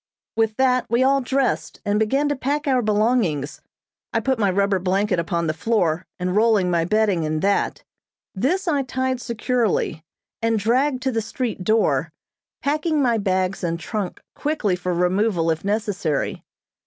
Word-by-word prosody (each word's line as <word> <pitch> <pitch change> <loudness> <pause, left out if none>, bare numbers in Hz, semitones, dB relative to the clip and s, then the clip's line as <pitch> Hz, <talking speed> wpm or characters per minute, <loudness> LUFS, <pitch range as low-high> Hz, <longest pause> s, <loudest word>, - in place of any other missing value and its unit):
With 225 -1 +1
that, 255 -2 +2
we 235 +2 +3
all 275 +1 +3
dressed, 265 0 -1
and 205 +1 +1
began 270 +7 +1
to 290 - 0
pack 285 +3 -2
our 260 -2 +3
belongings; 210 - 0 0.5
I - - +1
putting 260 -4 0
my 200 - +3
rubber 200 0 +1
blanket 190 +1 +1
upon 170 0 -1
the 155 - 0
floor 180 -4 0
and 180 +1 -2
rolling 210 -4 +3
my 170 -1 +2
bedding 210 -2 +2
in 155 0 -1
that. 200 +2 0 0.5
This 345 - 0
I 290 -4 +2
tied 260 -1 -2
securely, 235 -8 -1 0.4
and 225 0 +2
dragged 255 +5 +1
to 265 - +1
the 225 -2 0
street 225 -3 -4
door, 170 -9 +2 0.5
packing 305 +2 +1
my 240 -5 +2
bags 190 -1 0
and 170 -1 -1
trunk 190 +3 -4
quickly 285 -11 -1
for 180 0 -3
removal 180 -1 +1
if 160 0 -3
necessary. 200 -7 -1
215 Hz, 160 wpm, -22 LUFS, 180-255 Hz, 0.5 s, we